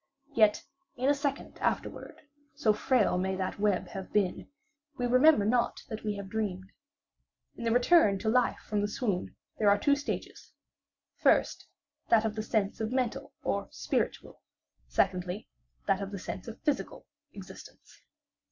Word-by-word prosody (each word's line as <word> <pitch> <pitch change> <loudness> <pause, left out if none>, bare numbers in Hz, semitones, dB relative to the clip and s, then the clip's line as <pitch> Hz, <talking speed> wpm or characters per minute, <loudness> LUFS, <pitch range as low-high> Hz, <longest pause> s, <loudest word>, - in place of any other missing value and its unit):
Yet 215 -3 +4 0.3
in 260 +3 +1
a - - +6
second 280 -1 -3
afterward, - - -3 0.3
(so 215 - +3
frail 215 -4 +2
may 190 +1 -1
that 190 +1 -3
web 205 -2 +1
have 190 -1 -7
been) 200 -4 0 0.5
we 245 - -1
remember 255 -1 +5
not 235 +2 +1
that 220 -1 -6
we 210 -1 -1
have 200 -1 -6
dreamed. 195 -3 -3 0.8
In 235 - -6
the 230 - +2
return 245 - +5
to 220 - -5
life 250 +3 +3
from 210 -1 0
the 205 - +1
swoon 205 -4 -2 0.2
there 210 -2 +4
are 200 - +5
two 280 +7 +3
stages; 285 +1 -6 0.6
first, - - +2 0.4
that 225 -1 +5
of 220 - 0
the 215 - -3
sense 215 -1 -1
of 220 +1 -2
mental 255 -3 -2
or - - -1
spiritual; - - -3 0.5
secondly, 180 +2 -1 0.4
that 195 0 +1
of 195 - -4
the 200 - -6
sense 185 +1 -6
of 230 - -8
physical, 295 -3 -2 0.3
existence. - - -13
215 Hz, 155 wpm, -30 LUFS, 200-245 Hz, 0.8 s, a